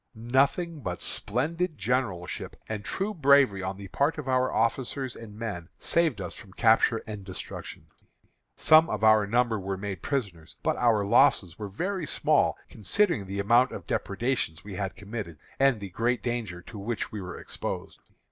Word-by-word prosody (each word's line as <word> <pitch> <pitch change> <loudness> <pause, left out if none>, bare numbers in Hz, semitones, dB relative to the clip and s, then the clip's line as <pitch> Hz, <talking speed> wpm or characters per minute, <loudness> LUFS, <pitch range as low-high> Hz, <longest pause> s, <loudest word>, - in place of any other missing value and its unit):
Nothing 140 +8 +1
but 90 -8 -4
splendid 160 - -1
generalship 105 -6 -2
and 105 -2 -4
true 195 - -2
bravery 140 - +4
on 95 +1 -4
the 100 -1 -8
part 145 - +1
of 150 -3 -6
our 130 0 +2
officers 125 +3 -1
and 105 -2 -10
men 100 -7 -5
saved 165 -10 +1
us 90 -2 -4
from 95 -4 -12
capture 115 +1 +3
and 105 -3 -7
destruction. 95 -1 -7 0.7
Some 160 +1 +6
of - - -3
our 110 -2 +6
number 115 0 +2
were 95 0 -3
made 95 -3 -5
prisoners, 100 - -3
but - - +1
our 115 -4 +3
losses 90 -3 +3
were 105 -2 -5
very 180 - -3
small - - +2
considering 140 - 0
the 100 +1 -5
amount 120 +6 +4
of - - -7
depredations 100 - -2
we 100 0 -8
had 95 -1 -3
committed, 100 -5 -6 0.2
and 135 -4 +4
the 100 -1 -6
great 120 +6 0
danger 110 -8 -3
to 105 - -9
which 110 +3 -3
we 105 - -5
were 90 -1 -7
exposed. - - -5
110 Hz, 165 wpm, -27 LUFS, 100-130 Hz, 0.7 s, Some